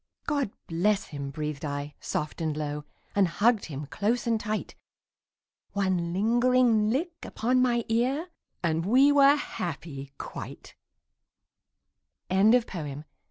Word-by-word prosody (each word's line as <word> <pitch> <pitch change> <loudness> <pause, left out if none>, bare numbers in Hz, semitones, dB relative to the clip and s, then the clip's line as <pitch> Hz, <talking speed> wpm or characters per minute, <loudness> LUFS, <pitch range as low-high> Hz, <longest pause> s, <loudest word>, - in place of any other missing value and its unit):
"God 285 -7 0 0.2
bless 195 +5 +1
him," 140 -2 -5
breathed 150 0 -4
I 145 0 -4
soft 150 +2 -3
and 155 -2 -1
low, 150 -1 -3 0.3
And 200 -2 +4
hugged 215 +6 +2
him 145 -2 -6
close 215 - -1
and 230 -2 +1
tight. 215 0 -3 1.0
One 185 -4 0
lingering 230 +2 +3
lick 325 +8 -2
upon 250 +3 +1
my 240 -2 +2
ear 260 +9 0 0.3
And 165 -1 +1
we 260 +9 +5
were 285 0 +7
happy 160 - -5
quite. - - -8 1.6
ANONYMOUS. 190 - +2
205 Hz, 115 wpm, -28 LUFS, 155-245 Hz, 1.6 s, were